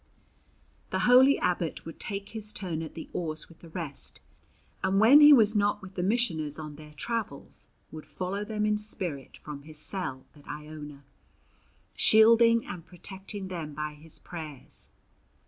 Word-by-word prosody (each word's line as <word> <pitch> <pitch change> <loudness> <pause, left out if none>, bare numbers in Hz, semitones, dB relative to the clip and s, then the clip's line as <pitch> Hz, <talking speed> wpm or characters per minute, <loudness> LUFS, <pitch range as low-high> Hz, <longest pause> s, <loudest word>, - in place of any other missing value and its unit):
The 190 - -1
holy 255 +3 +7
abbot 175 -2 -1
would 165 - -9
take 200 0 -5
his 215 -1 -4
turn 175 -6 -4
at 160 - -7
the 160 - -7
oars 155 -3 -3
with 165 - -18
the 170 - -13
rest, 160 -4 -6 0.6
and 195 +1 +3
when 255 +8 +8
he 295 0 +10
was 220 -6 +6
not 205 0 +2
with 190 0 -10
the 180 - -3
missioners 175 -8 0
on 155 -2 -7
their 150 0 -13
travels 210 -4 -4 0.2
would 155 -1 -9
follow 190 +3 -3
them 210 0 -1
in 210 0 +2
spirit 175 -10 -3
from 150 -2 -8
his 155 +1 -11
cell 150 -6 -3
at 145 - -18
Iona, 150 -1 -8 0.9
shielding 230 +1 +6
and 180 -4 -7
protecting 190 +2 -6
them 160 -5 -5
by 150 0 -3
his 155 +1 -3
prayers. 155 -6 -7
180 Hz, 160 wpm, -29 LUFS, 155-210 Hz, 0.9 s, he